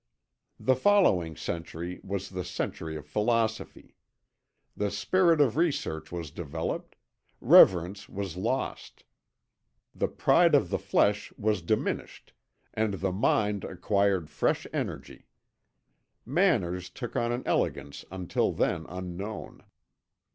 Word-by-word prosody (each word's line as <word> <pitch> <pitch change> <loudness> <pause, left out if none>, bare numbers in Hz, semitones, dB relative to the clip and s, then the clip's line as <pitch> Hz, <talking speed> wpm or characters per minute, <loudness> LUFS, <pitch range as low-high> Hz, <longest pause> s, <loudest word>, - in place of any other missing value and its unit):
"The 130 - +3
following 125 - +3
century 85 +3 -5
was 100 0 -4
the 90 -1 -4
century 80 -2 -4
of 75 -1 -7
philosophy. 110 +6 -1 0.8
The 105 0 -1
spirit 165 - +2
of 135 -4 +3
research 140 - -1
was 85 -4 -5
developed, 80 0 -5 0.4
reverence 95 +3 +5
was 95 -3 -5
lost; 115 +8 -3 0.9
the - - 0
pride - - +4
of - - +2
the - - 0
flesh 105 0 +1
was 105 -2 0
diminished 105 +6 -3 0.4
and 110 -2 0
the 95 0 -1
mind 105 +1 +1
acquired 95 -3 0
fresh - - 0
energy. - - -5 1.0
Manners 110 - +1
took 120 +5 -7
on 120 0 0
an 120 +1 -2
elegance 70 0 -1
until 95 -1 -1
then 80 -2 -1
unknown. 95 +3 -7
100 Hz, 110 wpm, -28 LUFS, 85-110 Hz, 1.0 s, reverence